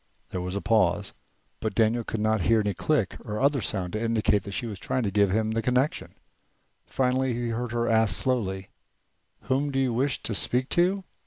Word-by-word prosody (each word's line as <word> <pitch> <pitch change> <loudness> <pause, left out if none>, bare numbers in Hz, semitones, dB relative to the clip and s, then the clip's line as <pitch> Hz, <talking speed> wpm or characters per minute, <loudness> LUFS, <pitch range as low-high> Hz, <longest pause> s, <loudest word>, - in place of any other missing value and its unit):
There 90 - -3
was 90 +1 -4
a 100 - -2
pause, 100 -3 +1 0.5
but 110 -3 -3
Daniel 115 +1 +2
could 110 - -4
not 110 -1 +1
hear 115 +5 +3
any 105 -1 0
click 140 -8 0
or 105 -2 -4
other 140 -1 +2
sound 90 -5 -3
to 110 - -2
indicate 110 -3 +2
that 100 - -6
she 120 - -2
was 105 -5 -6
trying 130 +6 -1
to 100 - -1
give 100 0 +3
him 110 +3 0
the 115 +1 0
connection. 125 +5 0 0.7
Finally 130 0 0
he 120 0 -2
heard 115 +1 -3
her 120 0 0
ask 110 -4 +3
slowly: 95 -7 -1 0.7
"Whom 135 +3 0
do 135 -1 -1
you 130 -3 +1
wish 130 +3 -1
to 115 - -3
speak 125 +5 +1
to?" 185 +3 +2
115 Hz, 200 wpm, -26 LUFS, 105-125 Hz, 0.7 s, hear